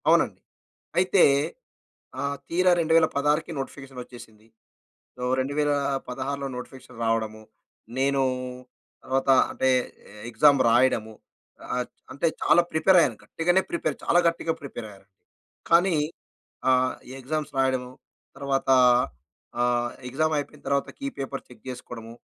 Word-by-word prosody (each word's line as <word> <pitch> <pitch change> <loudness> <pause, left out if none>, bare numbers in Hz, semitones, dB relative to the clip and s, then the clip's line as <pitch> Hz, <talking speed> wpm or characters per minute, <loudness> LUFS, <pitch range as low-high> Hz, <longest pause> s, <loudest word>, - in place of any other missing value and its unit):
అవునండి. - - +3 0.6
అయితే 185 +1 +4 1.0
ఆహ్, 140 0 -1
తీరా 180 +2 +3
2016కి 160 -1 +2
నోటిఫికేషనొచ్చేసింది. 125 -5 -9 0.7
సో 125 - -5
2016లో 140 -1 -1
నోటిఫికేషన్ 125 -1 -10
రావడము. 110 -1 -1 0.5
నేనూ 135 +1 +2 0.8
తర్వాత 135 +1 0 0.2
అంటే 130 - 0 0.6
ఎగ్జామ్ 140 +4 +5
రాయడము. 115 -2 +3 0.6
ఆహ్, 125 0 0 0.3
అంటే 155 +4 +1
చాలా 175 - +5
ప్రిపేర్ 180 +4 +5
అయ్యాను. 125 -9 +1
గట్టిగానే 175 +3 +1
ప్రిపేర్ 155 -4 -1
చాలా 175 - +4
గట్టిగా 165 -1 -1
ప్రిపేర్ 120 -5 -7
అయ్యా, 100 -1 -16 0.7
కానీ 175 +2 +5 0.8
ఆహ్, 130 0 +3 0.3
ఎగ్జామ్స్ 150 +2 -3
రాయడము 130 -1 0 0.5
తర్వాత 140 -1 -1 1.0
ఆహ్, 120 0 +1 0.2
ఎగ్జామ్ 155 +4 +1
అయిపోయిన 145 0 -7
తర్వాత 140 0 +1
కీ 275 - -3
పేపర్ 135 0 -5
చెక్ 120 -3 -17
చేసుకోవడము. 115 -2 -9
135 Hz, 105 wpm, -25 LUFS, 125-155 Hz, 1.0 s, ఎగ్జామ్